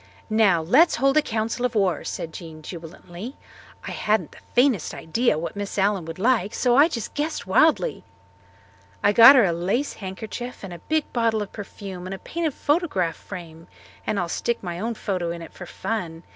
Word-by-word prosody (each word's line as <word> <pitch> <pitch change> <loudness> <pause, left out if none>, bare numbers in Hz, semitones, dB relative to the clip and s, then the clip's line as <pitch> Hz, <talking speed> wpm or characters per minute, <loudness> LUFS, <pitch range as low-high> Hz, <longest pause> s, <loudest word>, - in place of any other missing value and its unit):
"Now, 200 -7 +4
let's 275 - +5
hold 275 +3 +2
a - - +7
council 225 -1 -2
of 250 -1 0
war," 195 -4 +1
said 160 - -5
Jean 160 -2 -9
jubilantly. 175 - -9 0.5
"I - - -6
hadn't 210 -6 0
the - - -15 0.2
faintest 245 - +2
idea 230 +3 0
what 165 +5 -4
Miss 205 0 -5
Allen 195 -3 +1
would 165 0 -7
like 215 -1 +1
so 245 -2 +2
I 285 +4 +7
just 235 -10 -5
guessed 305 +2 -2
wildly. 315 - +3 1.0
I 205 - +4
got 235 +6 +10
her 245 -5 +6
a 175 - +1
lace 195 +12 -1
handkerchief 220 +6 -7
and 190 -2 -7
a 170 - -9
big 310 - -2
bottle 230 -3 +1
of 200 - -11
perfume 195 -3 -8
and 190 - -4
a - - -8
painted 320 - -3
photograph 290 - 0
frame 165 -4 -10 0.4
and 215 -2 0
I'll 175 - -1
stick 235 +7 -2
my 175 -1 -4
own 230 +3 -2
photo 185 -5 -2
in 170 0 -5
it - - -12
for 180 - -9
fun. 170 -7 -4
205 Hz, 190 wpm, -24 LUFS, 175-245 Hz, 1.0 s, got